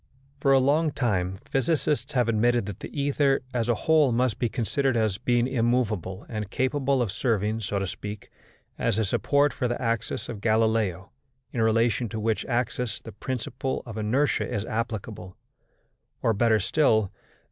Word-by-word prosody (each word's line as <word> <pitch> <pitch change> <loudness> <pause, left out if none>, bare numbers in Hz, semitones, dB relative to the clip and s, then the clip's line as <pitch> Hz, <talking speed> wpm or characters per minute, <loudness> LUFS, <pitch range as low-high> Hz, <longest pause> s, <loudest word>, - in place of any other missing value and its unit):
For 140 0 +3
a 135 - +7
long 145 +5 +3
time 95 -9 -1
physicists 145 +2 0
have 125 -3 +2
admitted 120 0 +2
that 100 -2 -7
the - - -7
ether 140 -1 +1
as 120 -1 0
a 120 - +3
whole 155 -4 +5
must 120 -2 +1
be 120 - +1
considered 130 +3 0
as 110 -3 0
being 120 0 +2
immovable 115 -7 0
and 110 -3 -4
capable 130 +1 +1
of 110 - -3
serving, 110 0 0
so 100 -2 -2
to 100 - -1
speak, 105 +2 -7 0.5
as 115 -3 +1
a 110 - +2
support 145 +8 +2
for 125 - -1
the 120 - -2
axes 115 -2 -2
of 110 -4 -6
Galileo, 110 -4 +1 0.4
in 115 - -1
relation 115 +1 +2
to 110 - -4
which 110 0 -1
axes 120 -2 -1
the 115 - -8
principle 130 +3 -4
of 115 -3 -8
inertia 115 +7 0
is 105 - -2
applicable, 110 -4 -4 0.9
or 115 - +3
better 110 +1 +3
still, 110 -2 +2
as - - -37
M. - - -34
115 Hz, 170 wpm, -26 LUFS, 110-130 Hz, 0.9 s, a